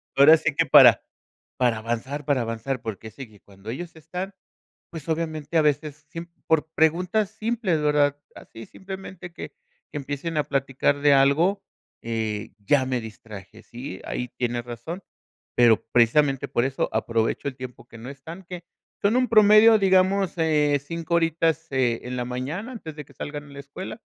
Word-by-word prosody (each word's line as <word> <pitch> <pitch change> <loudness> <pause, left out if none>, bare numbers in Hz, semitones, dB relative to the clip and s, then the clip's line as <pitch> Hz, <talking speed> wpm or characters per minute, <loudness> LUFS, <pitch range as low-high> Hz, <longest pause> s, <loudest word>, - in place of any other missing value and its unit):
Ahora 145 +4 +8
sí, - - -1
que - - +2
para - - +8 0.6
para 120 -3 +1
avanzar, 120 +6 -4
para 140 -3 +1
avanzar. 115 +3 -3
Porque 110 -1 -7
sé 125 +3 -10
que 105 -2 -20
cuando 100 +2 -11
ellos 165 +8 -6
están, 180 +5 -6 0.6
pues, 165 -2 -9
obviamente, 160 -1 -3
a 155 - +5
veces, 150 0 -1
siem 165 0 -7 0.2
por 160 -1 +2
preguntas 180 +6 +1
simples, 220 -7 -1
¿verdad? 145 -1 +2 0.2
Así, 115 0 -12
simplemente, 190 -2 -9
que - - -8 0.4
que - - -8
empiecen 145 +3 -4
a 150 - +1
platicar 135 +1 0
de 145 0 +5
algo, 160 +9 +3 0.4
eh, 110 -2 -3
ya 130 +6 +2
me 130 -1 -1
distraje, 110 -1 -11
¿sí? 125 +4 -8
Ahí 125 - -4
tienes 120 -1 -2
razón. 120 - -7 0.5
Pero, 120 -3 +4
precisamente, 135 +3 +3
por 120 - +1
eso 135 0 -1
aprovecho 115 +5 0
el 130 - -7
tiempo 125 -2 -9
que 115 - -14
no 120 - -9
están, 160 +7 -10
que 175 0 -9 0.4
Son 200 +3 +3
un 255 -2 +2
promedio, 215 0 +7
digamos, 190 0 +3
eh, 150 -3 +2
5 165 +2 -4
horitas, 165 -1 +1
eh, 125 -4 +1
en 125 0 -5
la 125 - -2
mañana, 145 - -5
antes 160 -10 -9
de 150 - -7
que - - -19
salgan 145 0 -6
a 145 - -15
la 140 - -10
escuela. 185 - -8
145 Hz, 170 wpm, -24 LUFS, 125-170 Hz, 0.6 s, Ahora